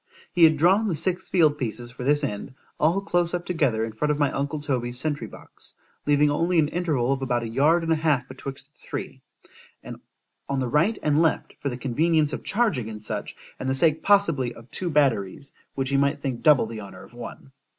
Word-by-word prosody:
He 170 Hz, -2 st, +6 dB
had 160 Hz, -1 st, +4 dB
drawn 190 Hz, +8 st, +4 dB
the 180 Hz, -, 0 dB
six 180 Hz, +3 st, -1 dB
field 155 Hz, -5 st, +3 dB
pieces 120 Hz, -1 st, -3 dB
for 125 Hz, 0 st, -8 dB
this 145 Hz, +3 st, +3 dB
end, 130 Hz, +1 st, -4 dB, 0.2 s
all 170 Hz, +6 st, +2 dB
close 175 Hz, -3 st, +1 dB
up 175 Hz, 0 st, -4 dB
together 135 Hz, -11 st, 0 dB
in 115 Hz, -, -6 dB
front 150 Hz, +8 st, -1 dB
of 150 Hz, -, 0 dB
my 145 Hz, -2 st, +1 dB
uncle 140 Hz, +2 st, -2 dB
Toby's 125 Hz, -4 st, -2 dB
sentry 145 Hz, -6 st, -2 dB
box, -, -, -12 dB, 0.3 s
leaving 145 Hz, 0 st, +4 dB
only 170 Hz, +4 st, +1 dB
an 150 Hz, -2 st, +3 dB
interval 150 Hz, -8 st, 0 dB
of 135 Hz, -, -4 dB
about 120 Hz, -2 st, 0 dB
a -, -, -3 dB
yard 150 Hz, +9 st, +2 dB
and 165 Hz, -, -1 dB
a -, -, 0 dB
half 150 Hz, -5 st, +1 dB
betwixt 135 Hz, +2 st, -8 dB
the -, -, -27 dB
three, -, -, -7 dB, 1.3 s
on 140 Hz, -1 st, 0 dB
the 130 Hz, -, -1 dB
right 165 Hz, -, +2 dB
and 150 Hz, +1 st, +3 dB
left, 165 Hz, -, 0 dB
for 140 Hz, -, -2 dB
the 125 Hz, -, -5 dB
convenience 150 Hz, +4 st, +1 dB
of -, -, -5 dB
charging, 150 Hz, -, 0 dB
&c.—and 110 Hz, +4 st, -6 dB
the 130 Hz, -, +1 dB
sake 155 Hz, +2 st, +2 dB
possibly 165 Hz, -12 st, +2 dB
of 115 Hz, +2 st, -15 dB
two 180 Hz, -, -3 dB
batteries, 135 Hz, -, 0 dB, 0.2 s
which 135 Hz, -1 st, -2 dB
he 140 Hz, -, +2 dB
might 140 Hz, +1 st, +1 dB
think 130 Hz, -4 st, -4 dB
double 150 Hz, -7 st, +5 dB
the 110 Hz, -1 st, -7 dB
honour 95 Hz, -2 st, -10 dB
of -, -, -16 dB
one. 120 Hz, +2 st, -9 dB
145 Hz, 210 wpm, -25 LUFS, 125-165 Hz, 1.3 s, He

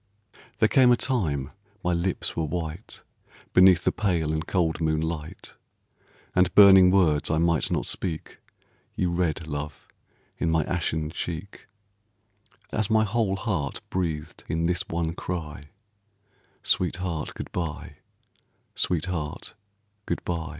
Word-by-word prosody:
There -, -, +4 dB
came 130 Hz, -2 st, +5 dB
a 120 Hz, -, +5 dB
time 80 Hz, -, -1 dB, 0.3 s
my 90 Hz, -, +1 dB
lips 85 Hz, +2 st, -1 dB
were 80 Hz, -, 0 dB
white 80 Hz, +4 st, -5 dB, 0.5 s
Beneath 90 Hz, -1 st, +6 dB
the -, -, +2 dB
pale 85 Hz, -7 st, 0 dB
and 80 Hz, +1 st, -3 dB
cold 85 Hz, -3 st, 0 dB
moonlight, 80 Hz, 0 st, -2 dB, 0.8 s
And 90 Hz, -1 st, +3 dB
burning 95 Hz, -2 st, +9 dB
words 85 Hz, -6 st, +3 dB
I 80 Hz, -, +1 dB
might 85 Hz, -1 st, +2 dB
not -, -, -1 dB
speak, 80 Hz, -4 st, -4 dB, 0.6 s
You 90 Hz, -, 0 dB
read, 85 Hz, -2 st, -1 dB
love, 75 Hz, -1 st, -6 dB, 0.5 s
in 85 Hz, -, +1 dB
my 80 Hz, -1 st, +2 dB
ashen 80 Hz, -2 st, -2 dB
cheek, 85 Hz, +5 st, -6 dB, 1.0 s
As 110 Hz, -1 st, 0 dB
my 110 Hz, 0 st, +4 dB
whole 110 Hz, -2 st, 0 dB
heart 95 Hz, -, -2 dB
breathed 80 Hz, -5 st, -3 dB
in 80 Hz, 0 st, -1 dB
this 90 Hz, +2 st, +1 dB
one 85 Hz, -1 st, -2 dB
cry, 80 Hz, -5 st, -5 dB, 1.0 s
"Sweetheart, 90 Hz, -3 st, -1 dB
good -, -, -7 dB
by, 80 Hz, -3 st, -5 dB, 0.8 s
sweetheart, 85 Hz, -3 st, -2 dB, 0.5 s
good 85 Hz, -, -3 dB
by." 80 Hz, -2 st, -3 dB
85 Hz, 125 wpm, -26 LUFS, 80-90 Hz, 1.0 s, burning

